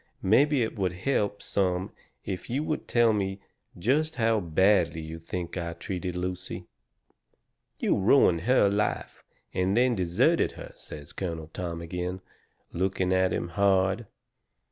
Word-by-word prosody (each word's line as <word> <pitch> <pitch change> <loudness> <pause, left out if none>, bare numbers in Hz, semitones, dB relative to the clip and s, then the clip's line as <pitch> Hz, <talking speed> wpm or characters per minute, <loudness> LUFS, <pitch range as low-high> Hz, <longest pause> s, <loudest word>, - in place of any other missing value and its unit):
Maybe 135 +6 +4
it 110 - -3
would 90 -2 0
help 105 0 -1
some 95 -1 0 0.3
if 95 -2 -5
you 135 +5 0
would 155 0 -3
tell 120 -2 +4
me 95 -1 -2 0.4
just 150 - +1
how 115 -2 +2
badly 90 -1 +2
you 80 +1 -7
think 85 +2 -5
I 85 -1 -3
treated 90 +1 -4
Lucy." 90 +1 -4 1.1
"You - - +1
ruined 95 -5 +4
her 125 +1 +4
life, 100 +1 -1 0.3
and 95 +3 +1
then 125 0 +4
deserted 90 -4 +2
her," - - -9
says 75 -1 -11
Colonel 80 -4 -5
Tom 85 -2 -4
agin, 90 +2 -4 0.5
looking 95 +1 0
at 95 0 +3
him 85 - -2
hard. 100 +3 +2
95 Hz, 140 wpm, -27 LUFS, 90-105 Hz, 1.1 s, Maybe